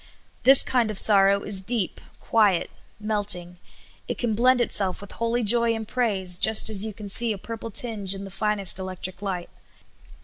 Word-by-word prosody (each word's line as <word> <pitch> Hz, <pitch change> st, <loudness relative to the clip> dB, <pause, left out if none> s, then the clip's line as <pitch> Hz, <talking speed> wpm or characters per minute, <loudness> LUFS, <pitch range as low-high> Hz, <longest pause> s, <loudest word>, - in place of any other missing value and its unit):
This 270 Hz, 0 st, +6 dB
kind 240 Hz, -4 st, -2 dB
of 215 Hz, -, -5 dB
sorrow 200 Hz, -1 st, +4 dB
is 200 Hz, -2 st, -1 dB
deep, 210 Hz, -1 st, 0 dB, 0.2 s
quiet, 205 Hz, -6 st, -1 dB, 0.3 s
melting; 200 Hz, -5 st, -2 dB, 0.5 s
it -, -, -6 dB
can 235 Hz, -3 st, -3 dB
blend 250 Hz, +3 st, +1 dB
itself 200 Hz, -5 st, -1 dB
with 200 Hz, -, -12 dB
holy 230 Hz, +1 st, -4 dB
joy 230 Hz, +1 st, +1 dB
and 220 Hz, -1 st, -8 dB
praise, 195 Hz, -7 st, -1 dB
just 220 Hz, 0 st, +5 dB
as 205 Hz, -2 st, -1 dB
3^ou 215 Hz, -2 st, -8 dB
can 210 Hz, -2 st, -10 dB
see 230 Hz, +4 st, +7 dB
a -, -, -9 dB
purple 230 Hz, +3 st, -10 dB
tinge 205 Hz, -3 st, 0 dB
in 195 Hz, -, -10 dB
the 195 Hz, -, -11 dB
finest 200 Hz, -1 st, -1 dB
electric 185 Hz, 0 st, -9 dB
light. 185 Hz, -4 st, -7 dB
210 Hz, 175 wpm, -22 LUFS, 195-230 Hz, 0.5 s, see